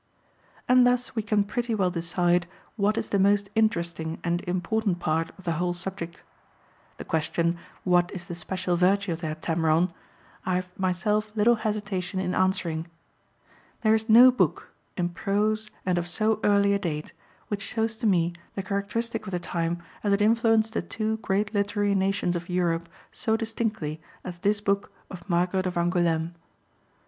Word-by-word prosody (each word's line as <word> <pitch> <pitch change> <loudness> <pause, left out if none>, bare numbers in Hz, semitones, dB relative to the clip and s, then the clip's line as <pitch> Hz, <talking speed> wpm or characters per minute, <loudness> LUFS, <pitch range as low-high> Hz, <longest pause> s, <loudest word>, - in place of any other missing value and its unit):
And 250 0 +6
thus 250 0 0
we 220 - +1
can 210 -1 +2
pretty 235 +2 -2
well 185 -3 +1
decide 175 0 +1 0.3
what 210 0 +1
is - - -2
the 200 - +1
most 200 +1 +3
interesting 170 -7 0
and 175 0 0
important 185 +2 0
part 165 0 0
of 190 - -14
the 170 - -1
whole 175 +2 -1
subject. 175 -2 -6 0.7
The - - -7
question, 170 +2 0 0.2
What 175 -1 +3
is 180 -2 -6
the - - -6
special 180 +1 -2
virtue 190 +2 +2
of 165 - -7
the 165 - -2
Heptameron? 160 +2 +1 0.5
I 185 - 0
have 180 0 -2
myself 210 +3 0
little 220 +3 +5
hesitation 205 -4 -2
in 180 -1 -1
answering. 175 -3 0 1.0
There 215 -1 +5
is 220 +1 0
no 245 +4 +9
book, 250 - 0 0.3
in 175 -2 0
prose 210 +4 0 0.2
and 180 -1 +2
of 175 - -4
so 215 +4 +1
early 200 -1 +4
a 200 - +1
date, 155 -5 -4 0.4
which 205 -1 -2
shows 225 +1 -1
to 225 - 0
me 175 -3 +2 0.2
the 195 - -3
characteristic 215 +3 -2
of - - -5
the 180 - -1
time 170 0 -2 0.2
as 205 -1 +2
it 200 - +2
influenced 225 0 +3
the - - 0
two 220 0 -2
great 205 0 -1
literary 205 0 +1
nations 195 -2 +1
of 175 +1 -5
Europe 170 -2 0 0.2
so 220 -2 0
distinctly 220 -9 -3 0.2
as 175 -1 -7
this 205 +2 +1
book 200 0 0 0.2
of 185 +1 -10
Margaret 180 +2 +1
of 180 - -3
Angoulême. 170 -1 +1
190 Hz, 170 wpm, -26 LUFS, 175-215 Hz, 1.0 s, no